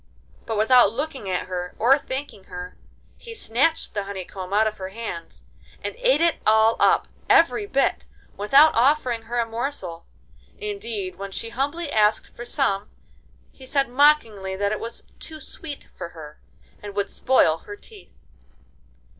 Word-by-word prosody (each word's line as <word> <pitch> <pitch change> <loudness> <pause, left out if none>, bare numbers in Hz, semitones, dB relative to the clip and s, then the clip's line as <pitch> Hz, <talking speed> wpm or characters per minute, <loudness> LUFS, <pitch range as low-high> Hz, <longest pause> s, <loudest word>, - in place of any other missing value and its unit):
But 225 - -2
without 220 0 +6
looking 270 -6 -4
at 180 - -1
her 180 -1 -5
or 250 +4 +5
thanking 265 -8 -6
her 180 0 -8 0.4
he 465 -1 -10
snatched 280 - 0
the 205 -2 -2
honey 195 -2 -6
comb 185 0 -8
out 210 +2 +4
of 215 0 -2
her 190 0 -5
hands 195 -5 -7 0.4
and - - -3
ate - - +3
it 335 -1 +3
all 220 +1 +5
up—every 415 -1 +3
bit, 275 -6 +1 0.3
without 275 +10 +6
offering 250 -2 +2
her 240 - -2
a 235 - +2
morsel. 225 -8 -5 0.5
Indeed, 415 -2 -5
when 200 0 -6
she 225 +4 -4
humbly 285 +6 -2
asked 215 0 +2
for 240 - -7
some 210 -7 0 0.6
he 265 - -16
said 275 -1 +1
mockingly 245 -9 +3
that 200 +1 0
it 215 - -2
was 230 0 -7 0.2
too 315 -1 -7
sweet 300 -2 -8
for 170 - -7
her, 150 -1 -10 0.4
and 205 -1 -8
would 200 -1 -1
spoil 165 -11 +3
her 410 - -9
teeth. 415 0 -16
230 Hz, 155 wpm, -24 LUFS, 200-290 Hz, 0.6 s, without